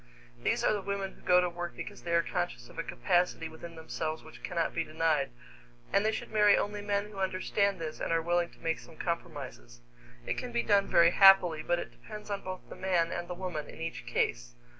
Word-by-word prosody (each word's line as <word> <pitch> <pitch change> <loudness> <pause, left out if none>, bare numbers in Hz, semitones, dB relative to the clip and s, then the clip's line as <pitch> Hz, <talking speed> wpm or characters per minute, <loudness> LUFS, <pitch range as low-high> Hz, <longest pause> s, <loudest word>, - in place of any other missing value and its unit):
These - - +1
are - - +4
the 205 - -1
women 195 0 -3
who - - -20
go 180 0 +5
to 180 - +1
work 175 0 -5
because 205 - -7
they 170 0 0
are 170 - +4
conscious 175 -10 -3
of - - -10
a - - 0
capacity 175 -3 +1
within 165 +1 -10
themselves 160 0 -4
which 160 - -13
cannot 170 -2 -1
be 165 - 0
denied, 155 -2 +1 0.6
and 200 +1 +4
they 220 - +3
should 220 - -5
marry 210 -2 +6
only 205 0 -2
men 205 0 -1
who 200 - -8
understand 195 +1 +1
this 160 -2 -5
and - - -2
are 165 - +3
willing 170 +1 +1
to - - -21
make 165 0 0
some 160 - -14
compromises. 140 - -5 0.4
It - - -2
can 250 - -5
be 235 0 0
done 200 -1 +3
very 170 0 +6
happily, 190 -5 +7
but 175 +2 +1
it - - -5
depends 210 -1 -10
on 200 -1 -2
both 185 0 -6
the - - -9
man 175 -3 +1
and 175 0 -3
the 180 - -5
woman 175 -5 -4
in - - -11
each 165 0 -5
case. - - -1
175 Hz, 225 wpm, -31 LUFS, 165-195 Hz, 0.6 s, happily